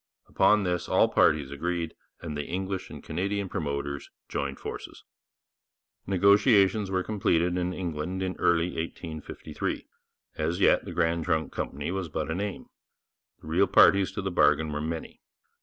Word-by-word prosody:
Upon 105 -1 +4
this 90 -2 -2
all - - +4
parties 75 -3 +3
agreed, 85 +3 -2 0.3
and 80 -3 -5
the 75 -1 -4
English 95 +1 -3
and - - -10
Canadian 100 +4 -2
promoters 70 -3 -3 0.2
joined 70 -1 -3
forces. - - -8 1.0
Negotiations 100 +1 +4
were 95 -1 0
completed 90 -4 +1
in 90 0 -1
England 90 +1 -3 0.2
early 85 0 +3
in - - -8
1853. 80 -1 -5 0.5
As 80 +4 -1
yet - - +4
the - - -6
Grand 85 -1 0
Trunk 80 -3 0
Company 70 +4 -3
was 95 -3 -3
but 80 +1 -3
a - - 0
name. 100 +2 -4 0.8
The - - -12
real - - +3
parties 100 -1 +5
to 100 - -4
the 95 - -2
bargain 80 -2 +3
were 75 0 -3
many. 80 +1 -5
85 Hz, 150 wpm, -27 LUFS, 80-95 Hz, 1.0 s, parties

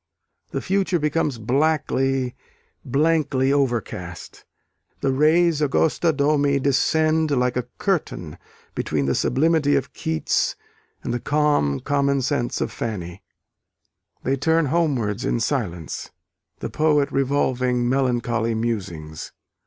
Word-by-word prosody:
The - - -4
future 190 -1 +1
becomes 150 -3 0
blackly, 135 0 0 0.5
blankly 140 -1 +1
overcast; 110 -11 -3 0.6
the 135 - +1
res 155 +3 +3
augusta 160 +3 +2
domi 145 -1 +2
descend 155 +3 +2
like 125 -3 +1
a 125 -1 -2
curtain 145 - -2 0.3
between 75 -3 -1
the 70 - +1
sublimity 145 - +2
of - - -2
Keats 80 -1 0 0.5
and - - -2
the 120 - -1
calm 145 - +1
commonsense 140 -2 0
of - - -1
Fanny. 90 -5 -5 1.0
They 135 +2 0
turn 160 +3 +2
homewards 125 -11 0
in 120 - 0
silence, 105 - -3 0.5
the - - -4
poet 150 -2 +2
revolving 130 -3 +1
melancholy 120 -3 0
musings. 90 -9 -4
135 Hz, 105 wpm, -23 LUFS, 115-150 Hz, 1.0 s, res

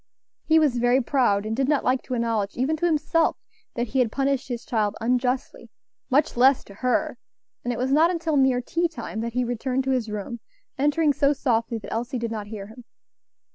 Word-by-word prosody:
He 320 - +4
was 290 -6 +3
very 245 +2 +3
proud, 235 -6 +1
and 220 +1 -2
did 270 +2 0
not 295 -2 +2
like 255 0 +1
to 255 - -3
acknowledge 225 -4 -1
even 270 +6 +1
to 345 - +1
himself 325 +1 +1 0.4
that 240 -1 -2
he 265 - 0
had 240 -4 +2
punished 275 0 0
his 240 -2 -5
child 215 -3 0
unjustly 250 +3 -1 0.4
much 285 +3 +2
less 260 +2 +4
to 200 - -14
her; 250 +5 -1 0.4
and 245 - -1
it 235 - -3
was 260 +2 -1
not 315 +4 +5
until 330 -3 -1
near 265 -2 +3
tea 340 +7 0
time 315 -8 -7
that 230 0 -4
he 250 +1 +1
returned 250 +2 -1
to 265 - -1
his 245 -4 0
room, 210 +3 -5 0.4
entering 295 +2 +2
so 285 0 +3
softly 230 -4 0
that 210 - -7
Elsie 240 +3 -2
did 230 -1 -3
not 210 -2 -5
hear 205 -2 -7
him. 225 +4 -13
250 Hz, 210 wpm, -24 LUFS, 230-280 Hz, 0.4 s, not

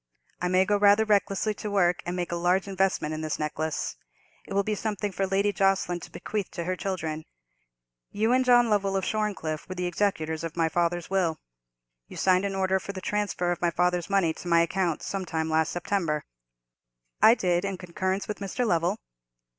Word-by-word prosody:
I 180 - +1
may 185 +1 +3
go 205 +1 +2
rather 205 +2 +5
recklessly 205 0 +1
to 210 - -6
work 180 -3 +2
and 175 - -2
make 175 -1 -3
a - - -1
large 180 +3 +1
investment 190 -5 0
in 155 - -4
this 155 -1 -2
necklace; 155 0 -3 0.5
it - - -6
will 200 - +3
be 215 - -1
something 205 -1 -2
for 190 +1 -1
Lady 200 +2 +1
Jocelyn 195 -2 +1
to - - -10
bequeath 210 -3 -4
to 170 - -3
her 185 +2 -1
children. 160 -5 -3 0.9
You 220 +3 0
and 255 0 +4
John 245 -1 +5
Lovell, 200 -2 +1
of 190 - -2
Shorncliffe, 200 -9 -2
were 185 - -4
the 180 0 -2
executors 170 -4 -1
to 165 -1 -4
my 165 -1 +2
father's 175 +1 -1
will. 180 -5 +1 0.7
You - - -10
signed 185 +1 +3
an 195 -1 -2
order 190 0 +1
for 200 - -7
the 190 - -5
transfer 195 -3 -1
of 175 - -3
my 175 - +3
father's 180 +1 0
money 195 -5 +2
to 175 - -10
my 170 -1 +5
account 170 -1 0
some 195 -1 -3
time 160 -2 -2
in - - -4
last 160 0 +2
September." 170 -4 -1 1.0
"I 225 - +8
did, 180 -4 +1
in 195 -1 -2
concurrence 185 +2 -2
with 210 - -4
Mr. 200 +5 -2
Lovell." 175 0 +1
185 Hz, 200 wpm, -27 LUFS, 170-200 Hz, 1.0 s, I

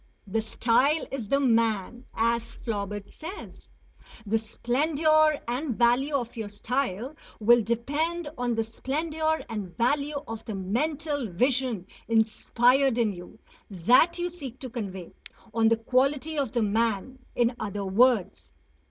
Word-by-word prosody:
"The 215 +3 -1
style 255 +7 +2
is 250 -6 -4
the 275 +6 +2
man," 230 -2 +1
as 230 +1 0
Flaubert 205 -2 -4
says. 355 +6 -9 0.6
The 220 +2 +1
splendour 305 +7 +2
and 250 0 -2
value 250 +5 +3
of 245 -3 -2
your 220 -3 -5
style 245 +3 -2 0.3
will 235 +2 +5
depend 290 +10 -1
on 245 -2 -1
the 225 - +1
splendour 315 +7 -2
and 205 -6 -6
value 285 +5 +1
of 225 0 -6
the 215 - -4
mental 285 - -2
vision 245 0 0 0.2
inspired 240 +3 +3
in 225 -4 +2
you, 180 +4 -11 0.3
that 235 - +4
you 350 0 -2
seek 275 -8 -9
to 255 -3 -7
convey; 190 -6 -6 0.4
on 225 0 +3
the 230 - +3
quality 270 +6 +1
of 275 -6 -1
the 235 -3 +1
man, 225 +3 0 0.2
in 240 0 +2
other 200 -1 -3
words. 220 +1 +2
240 Hz, 135 wpm, -27 LUFS, 220-280 Hz, 0.6 s, will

